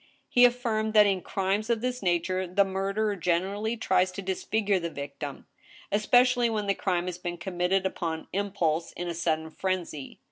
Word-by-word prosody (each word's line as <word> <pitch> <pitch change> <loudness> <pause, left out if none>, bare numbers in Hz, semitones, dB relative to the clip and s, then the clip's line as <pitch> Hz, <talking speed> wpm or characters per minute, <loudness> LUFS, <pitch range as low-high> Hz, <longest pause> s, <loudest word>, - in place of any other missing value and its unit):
He 245 0 +6
affirmed 225 -3 0
that 210 -1 +8
in 195 -2 +1
crimes 195 +5 -1
of 230 -2 +1
this 250 0 -2
nature 185 +1 0
the 195 +3 +3
murderer 195 +2 -1
generally 195 +6 -1
tries 185 -4 +2
to 195 +1 -6
disfigfure 200 +1 0
the 170 - -2
victim, 140 -1 -7 0.5
especially 245 +3 +4
when 215 -2 -1
the 200 - +2
crime 180 -3 -1
has 180 -1 -5
been 175 -1 -4
committed 180 +2 0
upon 165 -3 -3
impulse, 180 -5 -1
in 175 - -5
a 170 - -2
sudden 160 -1 -1
frenzy. 175 -6 -4
190 Hz, 170 wpm, -28 LUFS, 175-215 Hz, 0.5 s, that